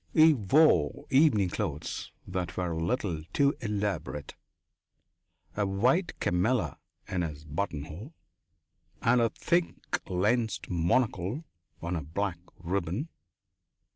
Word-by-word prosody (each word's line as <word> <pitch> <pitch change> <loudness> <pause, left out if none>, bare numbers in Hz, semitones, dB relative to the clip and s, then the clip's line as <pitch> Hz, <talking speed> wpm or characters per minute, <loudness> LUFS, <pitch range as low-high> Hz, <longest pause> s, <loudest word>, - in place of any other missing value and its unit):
He 160 0 +8
wore 105 - +3
evening 130 - +5
clothes - - -4 0.2
that 90 -2 -3
were 90 -2 -1
a 80 0 -2
little 90 -4 -1
too 140 0 +4
elaborate, 100 -9 -2 1.2
a 105 -1 +1
white 125 - +1
camellia 90 - +1 0.3
in 90 - -1
his 75 -3 -5
buttonhole, 80 - -4 0.9
and 120 0 +4
a 115 - +3
thick 170 +9 0 0.3
lensed 110 +6 0
monocle 95 - +1 0.4
on 85 +1 -1
a 80 - -1
black 85 +4 -2 0.2
ribbon. 95 - -2
100 Hz, 105 wpm, -29 LUFS, 85-125 Hz, 1.2 s, He